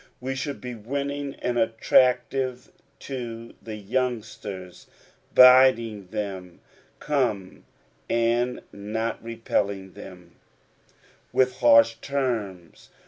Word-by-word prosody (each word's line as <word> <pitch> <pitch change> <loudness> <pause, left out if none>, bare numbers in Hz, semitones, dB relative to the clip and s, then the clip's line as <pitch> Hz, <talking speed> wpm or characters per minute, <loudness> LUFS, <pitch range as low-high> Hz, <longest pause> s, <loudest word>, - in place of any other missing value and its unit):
We 130 +1 -3
should 140 +2 -4
be 125 0 -6
winning 140 +5 -4
and 120 -1 0
attractive 125 +3 +1 0.3
to 115 -3 -7
the 110 -1 -7
youngsters, 105 -4 -4 0.5
bidding 125 -5 +6
them 95 -3 -6 0.4
''come," 120 -10 -1 0.5
and 115 +2 0
not 110 +3 -4
repelling 100 -4 -2
than 90 -4 -12 1.0
with 130 -1 +2
harsh 115 -2 +6
terms. 115 -11 -4
115 Hz, 85 wpm, -25 LUFS, 105-130 Hz, 1.0 s, bidding